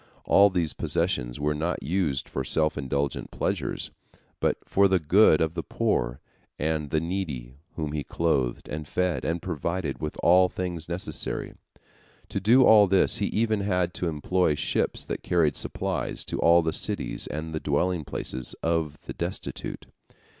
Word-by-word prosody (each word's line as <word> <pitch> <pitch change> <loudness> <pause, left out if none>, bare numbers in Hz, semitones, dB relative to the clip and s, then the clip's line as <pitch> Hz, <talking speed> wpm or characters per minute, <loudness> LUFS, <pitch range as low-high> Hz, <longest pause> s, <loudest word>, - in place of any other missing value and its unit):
All 100 +1 +6
these 85 -6 0
possessions - - -1
were 75 +1 +1
not 80 +4 -2
used 75 -3 -1
for 65 - -3
self 75 +3 +1
indulgent 70 -1 -2
pleasures, - - -3 0.5
but - - +1
for 100 0 +4
the 95 -1 +3
good 85 +1 +5
of 80 0 +1
the - - -3
poor - - -1 0.4
and 75 -1 -1
the 80 - +1
needy, 80 -8 -4 0.2
whom 75 -3 -3
he 75 -1 -2
clothed, 70 -8 -1
and 75 0 -5
fed, 90 0 0
and 85 +1 -2
provided 85 -3 -3
with 75 - -4
all 90 +1 +6
things 85 -3 -4
necessary. 90 +4 -3 0.8
To - - -2
do 115 +7 +5
all 105 -2 +7
this, 95 0 +4
he 100 - 0
even 110 -1 +1
had 90 -3 0
to 90 - -2
employ 80 +1 +1
ships - - -1
that - - -4
carried 80 -4 +2
supplies - - -3
to - - -4
all 85 0 +5
the 80 0 -1
cities - - -2
and 80 +1 -5
the 80 - -1
dwelling 80 +4 0
places 65 -2 -5
of 80 -3 0
the - - -6
destitute. - - -5
80 Hz, 160 wpm, -26 LUFS, 75-90 Hz, 0.8 s, all